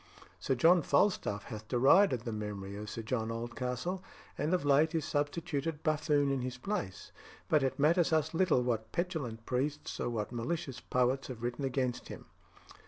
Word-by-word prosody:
Sir 135 Hz, -, 0 dB
John 170 Hz, +7 st, +5 dB
Falstaff 140 Hz, -, +1 dB
hath 110 Hz, -1 st, -8 dB
derided 130 Hz, -, +5 dB
the 115 Hz, 0 st, -4 dB
memory 105 Hz, -2 st, -5 dB
of 105 Hz, +1 st, -6 dB
Sir 115 Hz, -, -5 dB
John 110 Hz, -1 st, -2 dB
Oldcastle, 125 Hz, +10 st, -3 dB, 0.3 s
and 150 Hz, +3 st, -1 dB
of 180 Hz, -5 st, +1 dB
late 145 Hz, +3 st, +4 dB
is 160 Hz, -2 st, 0 dB
substituted 150 Hz, +1 st, -2 dB
buffoon 150 Hz, -3 st, +2 dB
in 135 Hz, -1 st, 0 dB
his 125 Hz, 0 st, -4 dB
place; 125 Hz, -, -4 dB, 0.4 s
but 155 Hz, -, +3 dB
it 135 Hz, -1 st, 0 dB
matters 165 Hz, +4 st, +3 dB
us 155 Hz, -1 st, +1 dB
little 165 Hz, -7 st, +3 dB
what 115 Hz, -2 st, -2 dB
petulant 150 Hz, -11 st, -3 dB
priests 140 Hz, +4 st, -2 dB
or -, -, -1 dB
what 110 Hz, -2 st, -3 dB
malicious 130 Hz, +2 st, -3 dB
poets 125 Hz, +2 st, 0 dB
have 120 Hz, -3 st, -8 dB
written 120 Hz, +3 st, -2 dB
against 130 Hz, -2 st, -1 dB
him." -, -, -9 dB
135 Hz, 170 wpm, -32 LUFS, 120-155 Hz, 0.4 s, John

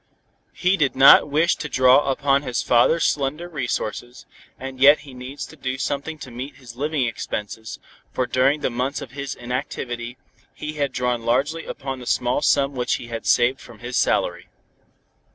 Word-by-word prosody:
He 185 Hz, +2 st, +2 dB
did 140 Hz, -5 st, +1 dB
not 135 Hz, +2 st, +8 dB
wish 160 Hz, +4 st, +2 dB
to 150 Hz, -, -5 dB
draw 130 Hz, +2 st, +4 dB
upon 140 Hz, +1 st, +2 dB
his 125 Hz, -4 st, -2 dB
father's 125 Hz, +7 st, +3 dB
slender 150 Hz, +4 st, -1 dB
resources, 120 Hz, -5 st, -4 dB, 0.3 s
and 130 Hz, 0 st, -7 dB
yet 145 Hz, +3 st, +7 dB
he 140 Hz, -2 st, -13 dB
must 125 Hz, -, -11 dB
needs 135 Hz, +3 st, -6 dB
do 130 Hz, 0 st, -5 dB
something 145 Hz, +4 st, -3 dB
to 130 Hz, -4 st, -10 dB
meet 130 Hz, +4 st, -7 dB
his 125 Hz, -3 st, -13 dB
living 145 Hz, 0 st, -1 dB
expenses, 110 Hz, -1 st, -5 dB, 0.3 s
for 125 Hz, -, -1 dB
during 135 Hz, +4 st, +2 dB
the 130 Hz, -, -1 dB
months 130 Hz, +4 st, -2 dB
of 125 Hz, -, -11 dB
his 140 Hz, 0 st, -5 dB
inactivity, 120 Hz, -1 st, -5 dB, 0.4 s
he 150 Hz, 0 st, -6 dB
had 145 Hz, -3 st, -1 dB
drawn 125 Hz, -2 st, -1 dB
largely 140 Hz, +8 st, 0 dB
upon 135 Hz, -2 st, -5 dB
the 125 Hz, -, -10 dB
small 125 Hz, +3 st, +1 dB
sum 140 Hz, -1 st, +2 dB
which 125 Hz, -2 st, 0 dB
he 120 Hz, -, -8 dB
had 115 Hz, -1 st, -5 dB
saved 125 Hz, +2 st, +3 dB
from 120 Hz, -, -13 dB
his 120 Hz, +3 st, -6 dB
salary. -, -, +1 dB
130 Hz, 175 wpm, -22 LUFS, 125-145 Hz, 0.4 s, not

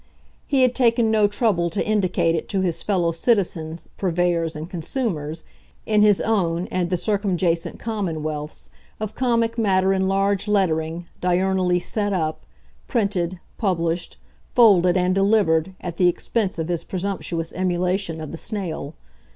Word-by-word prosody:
He 270 Hz, -2 st, +3 dB
had 255 Hz, -1 st, +3 dB
taken 235 Hz, -3 st, +3 dB
no 215 Hz, -2 st, +4 dB
trouble 205 Hz, -5 st, +1 dB
to 180 Hz, -, -2 dB
indicate 185 Hz, -5 st, +1 dB
it 165 Hz, -, -3 dB
to 195 Hz, -2 st, 0 dB
his 170 Hz, -3 st, -1 dB
fellow 180 Hz, -5 st, +1 dB
citizens, 165 Hz, -4 st, 0 dB
purveyors 170 Hz, -3 st, 0 dB
and 155 Hz, +1 st, -6 dB
consumers, 165 Hz, -, -3 dB, 0.4 s
in 215 Hz, -1 st, +3 dB
his 210 Hz, -2 st, +5 dB
own 180 Hz, -6 st, 0 dB
and 180 Hz, -2 st, 0 dB
the 180 Hz, -, +1 dB
circumjacent 185 Hz, -4 st, 0 dB
commonwealths, 155 Hz, -9 st, -4 dB, 0.3 s
of 215 Hz, -1 st, -4 dB
comic 230 Hz, -2 st, 0 dB
matter 190 Hz, -3 st, +3 dB
in 190 Hz, 0 st, +1 dB
large 195 Hz, +1 st, +1 dB
lettering, 170 Hz, -4 st, 0 dB, 0.2 s
diurnally 180 Hz, 0 st, +2 dB
"set 205 Hz, +3 st, -1 dB
up," 155 Hz, -3 st, -2 dB, 0.4 s
printed, 185 Hz, -6 st, -1 dB, 0.2 s
published, 170 Hz, -4 st, -1 dB, 0.3 s
folded 190 Hz, -7 st, +5 dB
and 180 Hz, 0 st, +2 dB
delivered, 190 Hz, -3 st, +2 dB
at 170 Hz, -2 st, -6 dB
the 180 Hz, -, +4 dB
expense 195 Hz, +3 st, -1 dB
of 160 Hz, -1 st, -2 dB
his 175 Hz, -2 st, -2 dB
presumptuous 180 Hz, -3 st, -3 dB
emulation 180 Hz, -1 st, -1 dB
of 155 Hz, -2 st, -6 dB
the 165 Hz, -, -6 dB
snail. 165 Hz, -8 st, -4 dB
185 Hz, 145 wpm, -22 LUFS, 170-205 Hz, 0.4 s, his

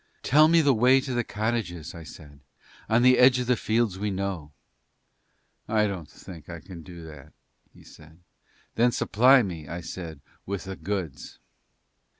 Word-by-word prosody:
"Tell 155 Hz, +4 st, +5 dB
me 165 Hz, +1 st, +5 dB
the 145 Hz, -3 st, +4 dB
way 125 Hz, +3 st, +4 dB
to 130 Hz, -1 st, -4 dB
the 120 Hz, -1 st, 0 dB
cottages," 105 Hz, -8 st, -3 dB
I 85 Hz, -, -9 dB
said, 75 Hz, -3 st, -13 dB, 0.5 s
"on 115 Hz, +2 st, +3 dB
the 125 Hz, 0 st, +5 dB
edge 125 Hz, 0 st, +6 dB
of 125 Hz, -, -2 dB
the 125 Hz, +1 st, +2 dB
fields 110 Hz, -4 st, 0 dB
we 105 Hz, +1 st, -1 dB
know." 95 Hz, -6 st, -4 dB, 1.2 s
"I 105 Hz, -1 st, +2 dB
don't 95 Hz, -7 st, -5 dB
think 85 Hz, -5 st, -12 dB
we 85 Hz, -1 st, -8 dB
can 85 Hz, 0 st, -11 dB
do 85 Hz, -1 st, -11 dB
that," 75 Hz, -2 st, -13 dB, 0.4 s
he -, -, -18 dB
said. 80 Hz, +1 st, -17 dB, 0.6 s
"Then 120 Hz, +2 st, +3 dB
supply 125 Hz, +4 st, +4 dB
me," 85 Hz, -7 st, -6 dB
I 85 Hz, +3 st, -6 dB
said, 80 Hz, -2 st, -8 dB, 0.2 s
"with 100 Hz, -1 st, -5 dB
the 95 Hz, 0 st, -7 dB
goods." 95 Hz, -9 st, -5 dB
100 Hz, 165 wpm, -26 LUFS, 85-120 Hz, 1.2 s, edge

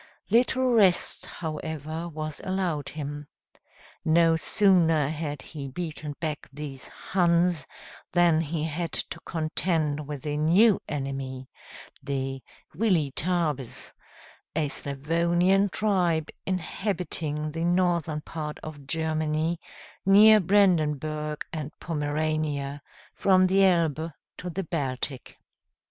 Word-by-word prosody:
Little 255 Hz, +2 st, +3 dB
rest, 195 Hz, -6 st, +3 dB
however, 160 Hz, 0 st, -5 dB
was 155 Hz, -1 st, -5 dB
allowed 180 Hz, -7 st, -1 dB
him. 145 Hz, -1 st, -6 dB, 0.8 s
No 165 Hz, 0 st, +4 dB
sooner 165 Hz, -5 st, +3 dB
had 150 Hz, -2 st, -4 dB
he 145 Hz, -3 st, -7 dB
beaten 150 Hz, 0 st, -5 dB
back 155 Hz, -3 st, -4 dB
these 140 Hz, -2 st, -7 dB
Huns, 175 Hz, -4 st, +1 dB, 0.4 s
than 170 Hz, -2 st, +4 dB
he 160 Hz, 0 st, -2 dB
had 165 Hz, +2 st, -3 dB
to 170 Hz, -, -3 dB
contend 155 Hz, -2 st, -1 dB
with 150 Hz, 0 st, -6 dB
a 150 Hz, 0 st, -1 dB
new 185 Hz, +8 st, +5 dB
enemy, 135 Hz, -2 st, -4 dB, 0.5 s
the 135 Hz, -1 st, -3 dB, 0.3 s
Weletabes, 160 Hz, -, 0 dB, 0.6 s
a 150 Hz, -3 st, +1 dB
Slavonian 170 Hz, +8 st, +1 dB
tribe 175 Hz, -4 st, +1 dB, 0.2 s
inhabiting 170 Hz, -5 st, -2 dB
the 165 Hz, +2 st, -3 dB
northern 170 Hz, -3 st, +1 dB
part 150 Hz, -1 st, -5 dB
of 145 Hz, -3 st, -9 dB
Germany, 160 Hz, +1 st, 0 dB, 0.4 s
near 215 Hz, +3 st, +8 dB
Brandenburg 155 Hz, -6 st, +1 dB
and 155 Hz, -2 st, -4 dB
Pomerania, 150 Hz, -2 st, -2 dB, 0.3 s
from 185 Hz, -1 st, +4 dB
the 195 Hz, +1 st, +4 dB
Elbe 165 Hz, -3 st, +2 dB, 0.3 s
to 180 Hz, -, -5 dB
the 190 Hz, +3 st, -3 dB
Baltic. 135 Hz, -5 st, -4 dB
160 Hz, 100 wpm, -27 LUFS, 150-175 Hz, 0.8 s, near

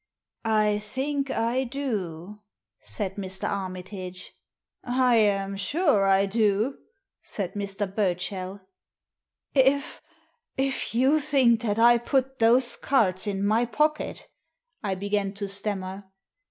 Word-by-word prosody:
" -, -, -53 dB, 0.2 s
I 210 Hz, 0 st, +1 dB
think 270 Hz, +6 st, -2 dB
I 240 Hz, +2 st, 0 dB
do," 210 Hz, -, -4 dB, 0.4 s
said 185 Hz, -, -4 dB
Mr. 190 Hz, -1 st, -3 dB
Armitage. 185 Hz, -1 st, -6 dB, 0.3 s
" -, -, -66 dB
I 250 Hz, -1 st, +3 dB
am 200 Hz, -2 st, +2 dB
sure 210 Hz, -, +2 dB
I 195 Hz, 0 st, +4 dB
do," 215 Hz, +4 st, +1 dB, 0.4 s
said 195 Hz, -4 st, -4 dB
Mr. 200 Hz, 0 st, -3 dB
Burchell. 190 Hz, 0 st, -2 dB, 0.9 s
"If— 275 Hz, +1 st, +2 dB, 0.6 s
if 265 Hz, -4 st, -1 dB
you 265 Hz, +6 st, +4 dB
think 265 Hz, -6 st, +3 dB
that 210 Hz, -3 st, -1 dB
I 235 Hz, +1 st, +6 dB
put 265 Hz, +2 st, -1 dB
those 240 Hz, +2 st, +4 dB
cards 210 Hz, -7 st, +1 dB
in 200 Hz, -1 st, -1 dB
my 220 Hz, +4 st, +3 dB
pocket," 300 Hz, +6 st, -1 dB, 0.6 s
I 195 Hz, -2 st, -1 dB
began 200 Hz, 0 st, -1 dB
to 200 Hz, 0 st, -4 dB
stammer. 195 Hz, -1 st, -3 dB
210 Hz, 120 wpm, -26 LUFS, 195-255 Hz, 0.9 s, I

